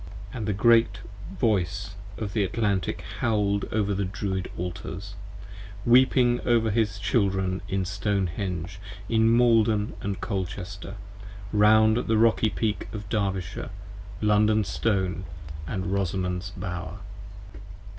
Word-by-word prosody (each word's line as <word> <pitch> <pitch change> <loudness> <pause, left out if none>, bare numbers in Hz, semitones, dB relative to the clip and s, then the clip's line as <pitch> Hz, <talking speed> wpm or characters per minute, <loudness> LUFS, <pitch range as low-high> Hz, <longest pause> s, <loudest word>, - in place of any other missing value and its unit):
5 - - -12
And 110 -4 -3
the 105 - +1
Great 115 +3 +4 0.4
Voice 100 -7 0 0.2
of 105 -3 -4
the 105 - +2
Atlantic 100 -1 -1 0.2
howled 105 -3 +1
over 105 -2 +1
the 100 +1 -1
Druid 95 -1 -3
Altars: 90 +2 -5 0.7
Weeping 120 0 +5
over 115 -2 +3
his 105 -1 +1
Children 95 -2 0
in 95 -1 0
Stone 100 -1 -1
henge, 90 -3 -4 0.3
in 115 0 +4
Maiden 110 -3 +3
& 100 -1 -2
Colchester, 95 0 -4 0.6
Round 110 +1 +5
the 110 -1 +3
Rocky 110 0 +4
Peak 105 0 -2
of 105 -2 -7
Derbyshire, 95 -5 -2 0.5
London 105 0 +3
Stone 95 -2 -1 0.2
& 75 +1 -9
Rosamond's 95 0 -2
Bower. 90 0 -5
100 Hz, 115 wpm, -26 LUFS, 95-110 Hz, 0.7 s, Weeping